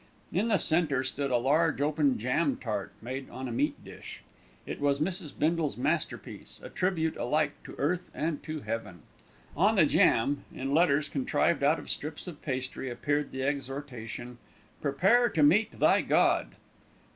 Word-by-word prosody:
In 195 Hz, +7 st, +1 dB
the 215 Hz, -3 st, +3 dB
centre 155 Hz, -7 st, +2 dB
stood 140 Hz, +1 st, -2 dB
a 125 Hz, -, +3 dB
large 145 Hz, +5 st, +2 dB
open 145 Hz, -2 st, +2 dB
jam 130 Hz, +5 st, 0 dB
tart 105 Hz, -4 st, -4 dB
made 130 Hz, +3 st, -5 dB
on 130 Hz, 0 st, -6 dB
a -, -, -5 dB
meat 115 Hz, -, -1 dB
dish. -, -, -10 dB, 0.4 s
It -, -, -6 dB
was 140 Hz, -1 st, +2 dB
Mrs. 170 Hz, -1 st, -1 dB
Bindle's 160 Hz, -3 st, 0 dB
masterpiece, 155 Hz, +6 st, -3 dB
a -, -, -7 dB
tribute 165 Hz, -4 st, 0 dB
alike 145 Hz, +3 st, +1 dB
to -, -, -9 dB
earth 175 Hz, +5 st, -1 dB
and 155 Hz, -1 st, -2 dB
to 155 Hz, -1 st, -5 dB
heaven. 105 Hz, -, -5 dB, 0.5 s
On 205 Hz, +8 st, +3 dB
the 175 Hz, -6 st, +6 dB
jam, 140 Hz, 0 st, +3 dB
in 135 Hz, +2 st, -3 dB
letters 150 Hz, -2 st, +3 dB
contrived 140 Hz, +4 st, 0 dB
out 145 Hz, +3 st, +4 dB
of -, -, -9 dB
strips 150 Hz, +2 st, -4 dB
of 170 Hz, -5 st, -9 dB
pastry, 130 Hz, -1 st, -3 dB
appeared 145 Hz, +4 st, -1 dB
the 130 Hz, 0 st, -4 dB
exhortation, 135 Hz, -4 st, -4 dB, 0.4 s
"Prepare 195 Hz, -, +3 dB
to 155 Hz, -, +1 dB
Meet 210 Hz, +10 st, +3 dB
Thy -, -, +5 dB
God." -, -, +3 dB
145 Hz, 160 wpm, -29 LUFS, 130-160 Hz, 0.5 s, the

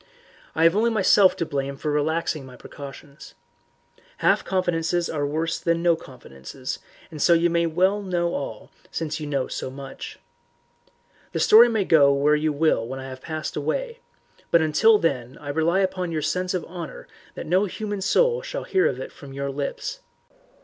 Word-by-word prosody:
"I 160 Hz, -, +2 dB
have 165 Hz, +2 st, +5 dB
only 225 Hz, +3 st, +3 dB
myself 200 Hz, -3 st, +5 dB
to 165 Hz, -, -2 dB
blame 140 Hz, -2 st, -3 dB
for 150 Hz, +2 st, -2 dB
relaxing 155 Hz, 0 st, 0 dB
my 130 Hz, -1 st, -12 dB
precautions. 140 Hz, +1 st, -11 dB, 0.8 s
Half -, -, +2 dB
confidences 175 Hz, -2 st, 0 dB
are 145 Hz, -2 st, -1 dB
worse 160 Hz, +3 st, -2 dB
than 170 Hz, 0 st, 0 dB
no 170 Hz, -1 st, +4 dB
confidences, 130 Hz, -, -8 dB, 0.3 s
and 155 Hz, -2 st, -7 dB
so 170 Hz, -, +5 dB
you 170 Hz, 0 st, +3 dB
may 170 Hz, 0 st, +2 dB
know 180 Hz, 0 st, +1 dB
all 110 Hz, -6 st, -5 dB, 0.2 s
since 155 Hz, -1 st, -3 dB
you 150 Hz, -, -5 dB
know 140 Hz, -3 st, -1 dB
so -, -, -5 dB
much. 135 Hz, 0 st, -9 dB, 1.2 s
The -, -, -1 dB
story 235 Hz, +3 st, +7 dB
may 220 Hz, -4 st, 0 dB
go 145 Hz, -5 st, +6 dB
where 140 Hz, +2 st, +3 dB
you 155 Hz, +1 st, 0 dB
will 150 Hz, -5 st, +2 dB
when 135 Hz, +2 st, -6 dB
I 135 Hz, 0 st, -7 dB
have 130 Hz, 0 st, -9 dB
passed 155 Hz, -1 st, -5 dB
away, 465 Hz, -, -2 dB, 0.5 s
but 170 Hz, -, +5 dB
until 210 Hz, +9 st, +5 dB
then 130 Hz, -, -2 dB
I 145 Hz, -, -8 dB
rely 160 Hz, +6 st, +2 dB
upon 185 Hz, -2 st, -1 dB
your 155 Hz, -2 st, -2 dB
sense 180 Hz, +4 st, -1 dB
of 175 Hz, -, -3 dB
honour 170 Hz, -4 st, -8 dB, 0.3 s
that -, -, -6 dB
no 185 Hz, +5 st, +2 dB
human 205 Hz, +1 st, -4 dB
soul 485 Hz, -, +2 dB
shall -, -, -5 dB
hear 380 Hz, +3 st, +2 dB
it -, -, -4 dB
from 140 Hz, -3 st, -12 dB
your 140 Hz, 0 st, -3 dB
lips. 145 Hz, -, -4 dB
165 Hz, 175 wpm, -24 LUFS, 140-185 Hz, 1.2 s, story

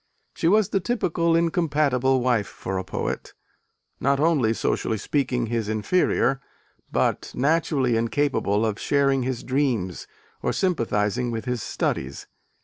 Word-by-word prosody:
She -, -, -1 dB
was 210 Hz, +2 st, +4 dB
the 195 Hz, -, +1 dB
typical 170 Hz, -6 st, 0 dB
incompatible 150 Hz, -6 st, +2 dB
wife 120 Hz, -6 st, +1 dB
for 95 Hz, 0 st, -4 dB
a -, -, -4 dB
poet: -, -, -4 dB, 0.6 s
not 140 Hz, +1 st, +2 dB
only, 145 Hz, -8 st, +3 dB
socially 110 Hz, 0 st, -1 dB
speaking, 125 Hz, 0 st, -1 dB
his 115 Hz, -2 st, -2 dB
inferior, 135 Hz, -, +1 dB, 0.5 s
but -, -, 0 dB
naturally 140 Hz, -3 st, +1 dB
incapable 115 Hz, -3 st, +1 dB
of 110 Hz, -1 st, -2 dB
sharing 140 Hz, -2 st, +2 dB
his 125 Hz, -1 st, -3 dB
dreams 125 Hz, -, -1 dB, 0.3 s
or -, -, 0 dB
sympathising 115 Hz, -, 0 dB
with 115 Hz, -1 st, -4 dB
his 125 Hz, -2 st, -2 dB
studies. 65 Hz, -7 st, -3 dB
130 Hz, 130 wpm, -24 LUFS, 115-150 Hz, 0.6 s, was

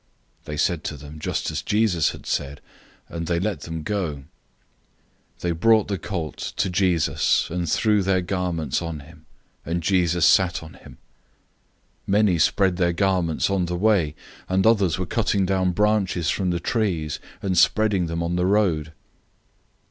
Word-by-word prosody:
011:006 -, -, -37 dB
They 75 Hz, -1 st, -5 dB
said 85 Hz, +2 st, 0 dB
to 80 Hz, -6 st, -4 dB
them 75 Hz, +2 st, -11 dB
just 75 Hz, -, -2 dB
as 75 Hz, -1 st, -3 dB
Jesus 105 Hz, -5 st, +1 dB
had -, -, -9 dB
said, 70 Hz, +1 st, -3 dB, 0.5 s
and 85 Hz, -1 st, -5 dB
they 85 Hz, -1 st, 0 dB
let 95 Hz, -3 st, -2 dB
them 80 Hz, -1 st, -6 dB
go. 95 Hz, -4 st, -2 dB
011:007 70 Hz, -, -12 dB, 1.2 s
They 90 Hz, -, 0 dB
brought 110 Hz, +5 st, +3 dB
the 100 Hz, -3 st, -2 dB
young 95 Hz, -5 st, -2 dB
donkey 80 Hz, -, -6 dB
to -, -, 0 dB
Jesus, 85 Hz, -6 st, +1 dB
and 85 Hz, -1 st, -2 dB
threw 105 Hz, +4 st, +2 dB
their 95 Hz, -1 st, +1 dB
garments 85 Hz, -6 st, -2 dB
on 85 Hz, -2 st, -5 dB
it, 80 Hz, +3 st, -15 dB, 0.5 s
and 85 Hz, +1 st, -3 dB
Jesus 90 Hz, -2 st, +2 dB
sat 90 Hz, -4 st, +3 dB
on 80 Hz, -, -11 dB
it. -, -, -16 dB
011:008 -, -, -13 dB, 1.1 s
Many 100 Hz, -3 st, +3 dB
spread 95 Hz, +2 st, +2 dB
their 85 Hz, -2 st, +1 dB
garments 90 Hz, -2 st, 0 dB
on 95 Hz, -2 st, +1 dB
the 90 Hz, -, -2 dB
way, 95 Hz, -7 st, +2 dB, 0.3 s
and 95 Hz, +2 st, +1 dB
others 100 Hz, -8 st, +3 dB
were 95 Hz, -, -2 dB
cutting 100 Hz, -2 st, 0 dB
down 95 Hz, -1 st, +1 dB
branches 100 Hz, -3 st, +1 dB
from 95 Hz, -2 st, -1 dB
the 85 Hz, -1 st, -1 dB
trees, 85 Hz, -7 st, -1 dB, 0.2 s
and 95 Hz, -2 st, 0 dB
spreading 95 Hz, 0 st, +3 dB
them 85 Hz, +1 st, -3 dB
on 85 Hz, +1 st, -1 dB
the 90 Hz, +1 st, +1 dB
road. 85 Hz, -7 st, +1 dB
90 Hz, 170 wpm, -23 LUFS, 80-95 Hz, 1.2 s, brought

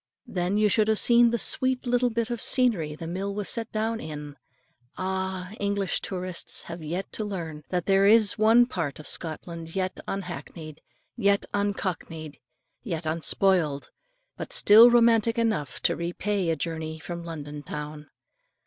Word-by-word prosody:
Then 180 Hz, +2 st, -1 dB
you 215 Hz, 0 st, +4 dB
should 215 Hz, +1 st, +2 dB
have 220 Hz, 0 st, +2 dB
seen 240 Hz, +1 st, +5 dB
the 235 Hz, -, 0 dB
sweet 255 Hz, +4 st, +2 dB
little 245 Hz, 0 st, +2 dB
bit 230 Hz, 0 st, -2 dB
of 235 Hz, -, -3 dB
scenery 205 Hz, -, +1 dB
the 165 Hz, -, -8 dB
mill 195 Hz, +4 st, -4 dB
was 205 Hz, -1 st, -2 dB
set 230 Hz, -1 st, -2 dB
down 225 Hz, +1 st, -1 dB
in. 150 Hz, -3 st, -7 dB, 0.6 s
Ah! 190 Hz, 0 st, -3 dB
English 200 Hz, -2 st, 0 dB
tourists 185 Hz, -2 st, -3 dB
have 170 Hz, 0 st, -8 dB
yet 175 Hz, +5 st, -4 dB
to 215 Hz, -, -2 dB
learn, 170 Hz, -7 st, -5 dB
that 180 Hz, -2 st, -1 dB
there 195 Hz, 0 st, +4 dB
is 215 Hz, -2 st, +5 dB
one 225 Hz, +3 st, +5 dB
part 165 Hz, -, -4 dB
of 150 Hz, -, -11 dB
Scotland 165 Hz, +1 st, -5 dB
yet 185 Hz, -1 st, -2 dB
unhackneyed, 175 Hz, -5 st, -7 dB, 0.3 s
yet 200 Hz, -3 st, +2 dB
uncockneyed, 175 Hz, -7 st, -3 dB, 0.4 s
yet 170 Hz, -8 st, -4 dB
unspoiled, 160 Hz, -1 st, +1 dB, 0.5 s
but -, -, -7 dB
still 235 Hz, -, +8 dB
romantic 230 Hz, -1 st, +4 dB
enough 185 Hz, -, -1 dB
to -, -, +2 dB
repay 175 Hz, +2 st, -2 dB
a 165 Hz, -, +1 dB
journey 160 Hz, +1 st, -4 dB
from 170 Hz, +1 st, -7 dB
London 150 Hz, -3 st, -7 dB
town. 150 Hz, +1 st, -7 dB
190 Hz, 155 wpm, -26 LUFS, 160-215 Hz, 0.6 s, still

